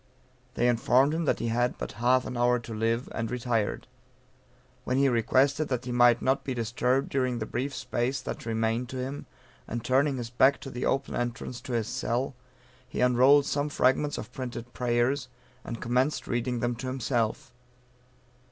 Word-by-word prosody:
They 120 - +2
informed 125 +4 +3
him 165 +1 -1
that - - +2
he 115 - -2
had 120 +2 0
but - - -5
half 125 +1 +3
an - - -5
hour 120 0 +3
to 120 -1 -8
live, 115 +3 0
and 115 0 -2
retired; 120 -4 -1 1.0
when 125 - 0
he 140 0 +4
requested 135 +5 +2
that 125 -1 -2
he 125 - -4
might 120 -1 +4
not 130 +1 +1
be 130 - -3
disturbed 125 +3 0
during 130 -3 0
the 110 - -3
brief 130 +5 -3
space 125 +3 -1
that - - -6
remained 115 +2 0
to 130 - -5
him, 130 +3 -5 0.4
and 120 +1 -4
turning 135 +2 +2
his 120 -1 -5
back 130 +3 +4
to 135 - -7
the 125 +1 -2
open 135 0 -1
entrance 120 0 -4
to 130 0 -6
his 115 -2 0
cell, 125 +5 -2 0.6
he - - -5
unrolled 130 +3 +5
some 145 +1 -1
fragments 145 +2 +2
of - - -7
printed 125 -2 -6
prayers, 125 +2 0 0.4
and 115 - -6
commenced 130 +5 +1
reading 120 0 -1
them 120 0 0
to 130 +2 -5
himself. 125 -3 -1
125 Hz, 180 wpm, -28 LUFS, 120-130 Hz, 1.0 s, unrolled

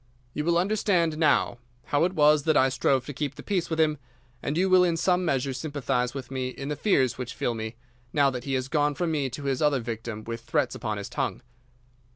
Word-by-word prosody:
You 150 - -2
will 170 0 +3
understand 180 -4 +1
now 150 -6 +2 0.2
how 145 +6 +2
it 180 - -1
was 150 -2 +5
that 155 -2 +4
I 130 - +5
strove 130 0 +1
to 145 - -6
keep 140 0 -3
the - - -10
peace 190 -4 -1
with 160 -1 -2
him, 155 -2 +2 0.4
and 145 +3 -2
you 185 +2 +3
will 185 -1 +6
in 170 -2 +1
some 180 +2 +2
measure 135 -4 0
sympathise 130 -2 -2
with 130 -2 -6
me 130 -1 -2
in 135 +2 -6
the 150 - -1
fears 130 - +1
which 125 0 -5
fill 120 - -1
me, 110 0 -5 0.4
now 140 -2 +3
that 125 -1 -6
he 135 - -2
has 130 0 -1
gone 145 0 +1
from 175 +1 -1
me 145 -4 0
to 135 +4 -7
his 135 0 -1
other 150 -3 +3
victim 115 -2 -5
with 115 0 -5
threats 120 - 0
upon 110 -3 -3
his 100 - -5
tongue. 135 -2 -3
140 Hz, 230 wpm, -26 LUFS, 125-160 Hz, 0.4 s, will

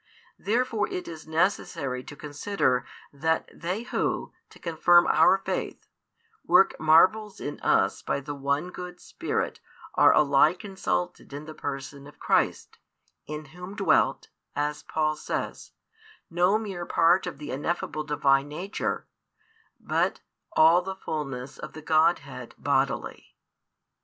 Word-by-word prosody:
Therefore 230 -1 0
it 180 - -5
is 160 -2 -9
necessary 160 -6 -1
to 145 - -9
consider 145 -3 -1 0.3
that 160 +3 0
they 180 +6 -3
who, - - -2 0.2
to - - -16
confirm 175 +1 +4
our 190 - +5
faith, 195 - -4 0.6
work 450 - +5
marvels 190 +7 +4
in 145 - -5
us - - +2
by - - -1
the 145 +1 -6
one 140 +5 -1
good 180 0 -8
Spirit - - -3 0.3
are - - +6
alike 150 +5 +4
insulted 135 - -3
in 145 +2 -6
the 155 - -8
Person 140 -1 -6
of 145 - -15
Christ, - - 0 0.5
in 150 +1 -6
Whom 180 +3 -8
dwelt, 195 -7 +2 0.3
as 150 0 -1
Paul 155 -1 -1
says, - - -5 0.6
no 180 +4 +3
mere 195 -6 -5
part 175 +3 +3
of - - -5
the 150 0 -7
ineffable 155 +2 -2
Divine 140 -2 +2
Nature, 175 +8 -3 0.7
but - - 0 0.3
all 165 +3 +6
the 190 +1 -5
fulness 140 -7 -5
[of - - -8
the 155 - -9
Godhead] 155 -5 +1
bodily. - - -1
155 Hz, 130 wpm, -27 LUFS, 145-180 Hz, 0.7 s, are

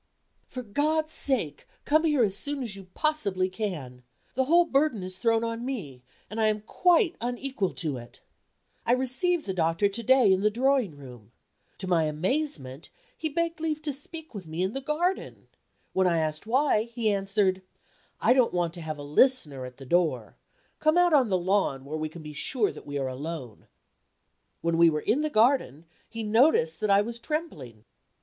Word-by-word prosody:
For 255 - -7
God's 310 +8 0
sake 220 - 0 0.2
come 310 +2 +3
here 295 -6 +3
as 195 -3 +1
soon 285 +4 -2
as 220 -5 -5
you 195 -1 -11
possibly 200 -13 0
can. 170 - -5 0.3
The 260 +1 +1
whole 340 +5 +5
burden 275 - +1
is 185 0 -8
thrown 225 +1 +2
on 230 0 -3
me 185 - -5 0.3
and 220 +2 -4
I 220 - +4
am 215 -1 0
quite 350 - +2
unequal 245 -3 -2
to 150 -6 -3
it. 120 0 -12 0.6
I 235 - +2
received 265 +7 +1
the 190 - -2
doctor 165 +3 +2
to 200 +4 -5
day 255 -3 +5
in 190 - +1
the 210 - +4
drawing 245 - +1
room. 125 -6 -13 0.5
To 190 - -6
my 170 -3 +2
amazement, 155 - -2 0.3
he 315 - -3
begged 335 +1 -1
leave 310 -1 -1
to 295 -2 -2
speak 315 +3 -8
with 195 -6 -8
me 160 +3 -2
in 190 +3 -1
the 270 - -3
garden. 335 +7 -2 0.4
When 190 -1 +3
I 170 -2 +2
asked 155 +4 -2
why, 260 -2 +3
he 235 -2 -1
answered: 195 -1 +1 0.6
"I - - +4
don't 255 -7 +2
want 170 -2 0
to 175 - -7
have 155 -1 -5
a 145 - -8
listener 150 - +2
at 125 0 -10
the 135 - -11
door. 170 +3 0 0.4
Come 310 +2 +3
out 355 -2 +4
on 265 -6 +4
the 185 - +2
lawn, 180 -7 0
where 150 +3 -5
we 155 0 -3
can 160 +1 -11
be 150 0 -8
sure 215 - -1
that - - -12
we 145 0 -3
are 135 -1 -1
alone." 130 -3 -7 0.9
When 165 0 0
we 170 0 +7
were 150 -1 -1
in 270 +7 +1
the 305 - 0
garden, 220 - +2 0.2
he 225 0 -5
noticed 210 - +3
that 215 - -1
I 200 0 +5
was 235 +2 -5
trembling. 155 - -5
210 Hz, 190 wpm, -27 LUFS, 160-270 Hz, 0.9 s, we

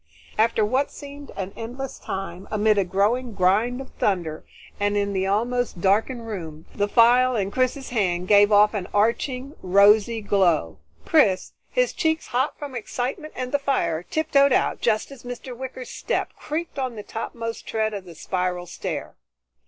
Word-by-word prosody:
After 220 0 +3
what 260 +6 +1
seemed 285 0 -10
an 195 0 -5
endless 245 +4 -6
time, 190 -1 -6
amid 215 -1 +3
a - - +3
growing 210 +7 0
grind 205 +7 +2
of 270 - -9
thunder 170 -6 0 0.4
and 205 0 +1
in 200 0 0
the 190 0 0
almost 235 +1 0
darkened 220 +6 +1
room, 165 -8 -7
the 205 0 0
phial 245 +3 +5
in 200 -3 -1
Chris's 255 +3 0
hand 185 -6 0
gave 205 +1 +6
off 210 +1 +6
an 195 -4 -3
arching 250 +6 0
rosy 205 +4 +5
glow. 180 - +1 0.3
Chris, 190 - +3 0.2
his - - +1
cheeks 320 0 0
hot 260 +4 0
from 290 -2 -7
excitement 255 +6 -4
and 250 0 -4
the 285 - +2
fire, 170 - 0
tiptoed 280 - +2
out 255 - +1
just 220 +3 +1
as 275 -3 -11
Mr. 245 +1 -7
Wicker's 260 0 -7
step - - -2
creaked 315 -1 -4
on 255 -3 -2
the 210 - -7
topmost 230 +1 -5
tread 220 -1 -1
of 200 -2 -6
the 170 -2 -11
spiral 180 +1 -2
stair. - - -5
220 Hz, 165 wpm, -24 LUFS, 195-255 Hz, 0.4 s, gave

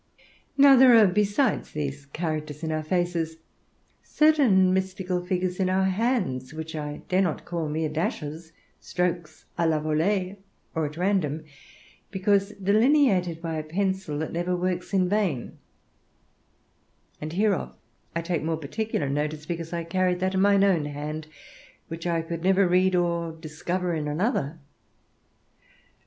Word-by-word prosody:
Now 275 -1 +8
there 255 -2 +8
are, 220 - +7
besides 205 +7 +1
these 140 -1 -4
characters 155 0 -4
in 160 - -1
our 155 0 -1
faces, 165 -1 -1 0.6
certain 255 -13 +4
mystical 190 -1 -1
figures 180 0 -2
in 185 -1 +1
our 190 +1 +2
hands, 185 - -1
which 160 0 -6
I 150 -1 -5
dare 185 +1 +2
not 175 -5 -1
call 170 -3 -3
mere 155 +1 -1
dashes, 155 0 -4 0.3
strokes 175 -3 -3
à 170 -1 +3
la 155 -1 +1
volée, 180 +6 0 0.4
or 160 -2 0
at 150 +2 -10
random, 175 -5 0 0.7
because 200 0 +1
delineated 200 - +2
by 165 -1 -2
a - - -4
pencil 190 -1 -2
that 155 +1 -4
never 175 +2 -1
works 180 +1 -2
in 190 -2 +2
vain; 185 - -1 1.6
and 155 +1 -5
hereof 200 +1 0 0.4
I 170 - -1
take 170 -1 -1
more 160 0 -1
particular 160 +1 -3
notice, 150 +2 -2
because 165 0 -5
I 170 -1 -2
carry 180 +2 +1
that 185 +1 -1
in 190 - +1
mine 200 0 +4
own 180 -7 +3
hand 150 +2 -5 0.6
which 165 +1 -5
I 165 -1 0
could 165 0 -5
never 190 +1 +4
read 185 +1 +3
of 175 - +3
or 170 -1 -2
discover 170 +3 -3
in 155 -2 -2
another. 160 - -1
175 Hz, 145 wpm, -26 LUFS, 155-190 Hz, 1.6 s, Now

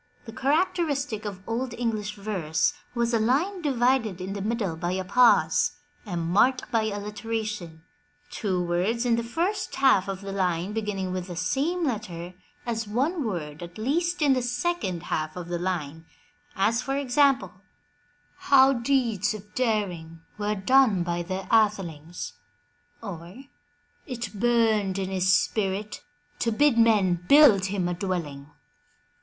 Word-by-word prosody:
The 225 - -9
characteristic 285 - 0
of 190 -2 -7
Old 235 +1 -2
English 215 -3 -2
verse 175 -7 -1 0.2
was 235 0 0
a 230 - +3
line 305 - +1
divided 245 - +1
in 185 +2 -5
the 200 - -5
middle 210 -5 -1
by 175 +2 -2
a 190 0 -2
pause 240 +6 +4 0.3
and 175 -4 -3
marked 240 +10 +2
by 225 -2 +2
alliteration, 210 -5 -4 0.5
two 185 -4 -1
words 185 +8 0
in 235 -1 +3
the 235 - 0
first 335 - -2
half 260 -8 +4
of 195 -1 -4
the 195 0 -6
line 185 0 -1
beginning 205 -4 -3
with 185 0 -4
the 175 - -7
same 280 - -1
letter 185 - -4 0.3
as 225 -2 -2
one 280 - 0
word 160 -8 -4
at 175 +2 -9
least 330 +9 0
in 280 -2 +5
the 255 - +1
second 245 - -2
half 155 -2 -3
of 175 -1 -7
the 175 -1 -2
line, 165 -3 -4 0.5
as 225 +5 +2
for 270 - -2
example: 265 - +1 0.8
How 270 -1 +5
deeds 235 -5 0
of 210 0 -12
daring 180 -9 -2
were 210 0 -1
done 215 -2 +3
by 175 0 -2
their 185 +2 -5
athelings," 175 - 0 0.7
or, 180 +7 -8 0.6
'*It 245 -5 -5
burned 215 -3 +2
in 190 -1 -3
his 185 0 +2
spirit 200 +2 0 0.4
to 230 - +1
bid 250 +1 +3
men 195 -6 +3
build 280 -10 +7
him 190 -2 -1
a 175 - -1
dwelling." 170 -6 -4
210 Hz, 145 wpm, -26 LUFS, 180-245 Hz, 0.8 s, build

